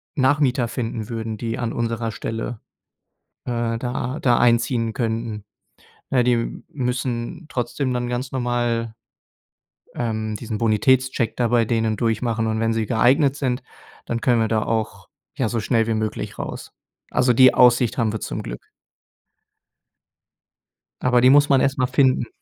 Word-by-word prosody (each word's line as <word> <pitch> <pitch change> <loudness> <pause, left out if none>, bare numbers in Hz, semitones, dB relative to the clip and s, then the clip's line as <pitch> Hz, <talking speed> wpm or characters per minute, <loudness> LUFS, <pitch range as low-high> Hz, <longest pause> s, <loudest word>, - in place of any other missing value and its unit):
Nachmieter 130 -3 +2
finden 115 -3 -4
würden, 110 -2 -4
die 115 +1 -3
an 120 -2 -2
unserer 115 -1 -2
Stelle, 115 0 -5 0.8
äh, 115 -1 -2
da 125 +3 -3
da 120 -2 +3
einziehen 115 -1 +2
könnten. 115 -3 -3 0.7
Äh, 130 -2 +3
die 120 -1 0
müssen 125 0 -3
trotzdem 130 +1 -2
dann 125 -1 -2
ganz 125 +2 -3
normal, 120 -3 -1 1.0
ähm, 110 -2 -3
diesen 110 -1 -5
Bonitätscheck 120 +3 +1
da 120 -2 +1
bei 120 -1 +3
denen 110 -1 0
durchmachen. 115 0 0
Und 110 0 -1
wenn 115 0 +1
sie 110 -1 -1
geeignet 130 +4 +3
sind, 130 -3 -1 0.4
dann 115 0 -3
können 120 -3 +3
wir 110 - +2
da 110 -1 0
auch, 110 -1 -3 0.3
ja, 120 -4 0
so 115 - -1
schnell 115 +1 +1
wie 115 - 0
möglich 110 -1 -3
raus. - - -6 0.4
Also, 125 0 +3
die 130 +1 +7
Aussicht 125 -1 +4
haben 115 -2 +1
wir 110 - -4
zum - - -4
Glück. - - -9 2.3
Aber 125 -1 +3
die 125 - +6
muss 145 +1 +5
man 135 -2 +4
erstmal 135 -2 +1
finden. 130 -2 +2
120 Hz, 145 wpm, -22 LUFS, 115-125 Hz, 2.3 s, die